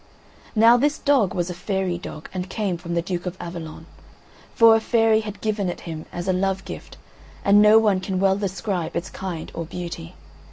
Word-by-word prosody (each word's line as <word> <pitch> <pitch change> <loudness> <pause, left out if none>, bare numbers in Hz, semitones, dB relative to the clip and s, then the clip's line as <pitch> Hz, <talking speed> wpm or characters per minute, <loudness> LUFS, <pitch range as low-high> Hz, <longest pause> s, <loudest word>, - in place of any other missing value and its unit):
Now 230 +2 +7
this 290 +4 +1
dog 260 - +2
was 175 0 -1
a - - -4
fairy 185 -1 -2
dog, 155 -3 -8
and 185 0 -4
came 200 -3 -1
from 170 0 -5
the 170 - 0
Duke 180 0 -4
of 180 +1 -5
Avalon; 165 -2 -7 0.7
for 230 -1 +7
a - - +3
fairy 225 -1 +3
had 210 -2 -7
given 210 -3 -1
it 175 - -6
him 160 -2 -7
as 175 +1 -5
a 185 - +2
love 190 +1 -1
gift, - - -9 0.5
and 200 +1 +6
no 210 +1 +7
one 210 -4 +3
can 185 0 -3
well 190 0 +3
describe 195 -3 -3
its 175 - -3
kind 180 -4 -6
or 165 - -4
beauty. 165 - -7
190 Hz, 200 wpm, -23 LUFS, 175-215 Hz, 0.7 s, Now